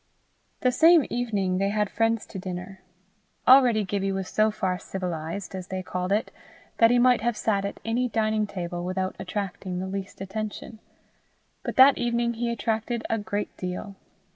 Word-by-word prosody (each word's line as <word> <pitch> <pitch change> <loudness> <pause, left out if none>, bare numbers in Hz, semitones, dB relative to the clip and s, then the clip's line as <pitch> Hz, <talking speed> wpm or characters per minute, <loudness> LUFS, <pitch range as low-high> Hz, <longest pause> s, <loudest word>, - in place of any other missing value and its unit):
The 255 - +3
same 325 +4 +6
evening 200 -6 0
they 195 0 +1
had 210 0 +1
friends 225 +1 0
to 195 - -8
dinner. 185 +1 -7 0.7
Already 250 -5 +7
Gibbie 195 0 -1
was 190 -1 -3
so 215 0 +3
far 185 -3 -2
civilized, 180 +1 -5
as 185 -1 -6
they 185 0 -4
called 180 +1 -3
it, 210 +2 +1 0.5
that 230 - +7
he 245 - +4
might 245 -2 +4
have 235 -1 0
sat 200 -3 0
at 200 - -5
any 245 +2 0
dining 215 -1 +1
table 175 -2 -5
without 185 +1 -2
attracting 190 -1 -4
the 185 - -3
least 195 0 -6
attention, 215 +3 -6 0.8
but - - -5
that 265 +1 +7
evening 235 0 0
he 235 +1 -2
attracted 225 +1 -2
a 225 - +1
great 205 0 -4
deal. 185 +2 -5
205 Hz, 165 wpm, -26 LUFS, 190-230 Hz, 0.8 s, Already